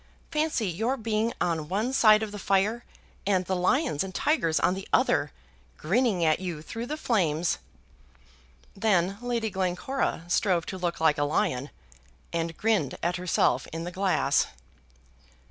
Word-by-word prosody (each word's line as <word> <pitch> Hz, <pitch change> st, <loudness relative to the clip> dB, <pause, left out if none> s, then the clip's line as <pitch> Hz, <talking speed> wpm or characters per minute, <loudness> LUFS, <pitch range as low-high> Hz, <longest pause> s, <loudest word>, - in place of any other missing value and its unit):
Fancy 300 Hz, -8 st, 0 dB
your 220 Hz, +10 st, -1 dB
being 225 Hz, 0 st, 0 dB
on 165 Hz, -4 st, -1 dB
one 215 Hz, +7 st, -1 dB
side 215 Hz, -4 st, +6 dB
of 215 Hz, -, -4 dB
the 205 Hz, -, -7 dB
fire 200 Hz, +5 st, +1 dB, 0.4 s
and 185 Hz, -2 st, +2 dB
the 190 Hz, -, -1 dB
lions 195 Hz, -, +1 dB
and 190 Hz, 0 st, -8 dB
tigers 260 Hz, -, +1 dB
on -, -, +2 dB
the 190 Hz, 0 st, -6 dB
other, -, -, +2 dB, 0.5 s
grinning 195 Hz, 0 st, +1 dB
at 155 Hz, -1 st, +3 dB
you 175 Hz, -5 st, -5 dB
through 230 Hz, +7 st, -6 dB
the 305 Hz, -, -3 dB
flames!" 175 Hz, -, +1 dB, 1.2 s
Then 195 Hz, -2 st, +1 dB
Lady 235 Hz, -3 st, -1 dB
Glencora 190 Hz, +3 st, -1 dB
strove 180 Hz, -2 st, +1 dB
to 190 Hz, -, -6 dB
look 175 Hz, -1 st, -2 dB
like 160 Hz, -2 st, +3 dB
a -, -, +2 dB
lion, 140 Hz, -2 st, 0 dB, 0.6 s
and 165 Hz, -1 st, -2 dB
grinned 210 Hz, -, +1 dB
at 175 Hz, +1 st, 0 dB
herself 170 Hz, -7 st, +1 dB
in 165 Hz, +1 st, -4 dB
the 175 Hz, -, -5 dB
glass. 185 Hz, -7 st, +2 dB
190 Hz, 150 wpm, -27 LUFS, 170-225 Hz, 1.2 s, side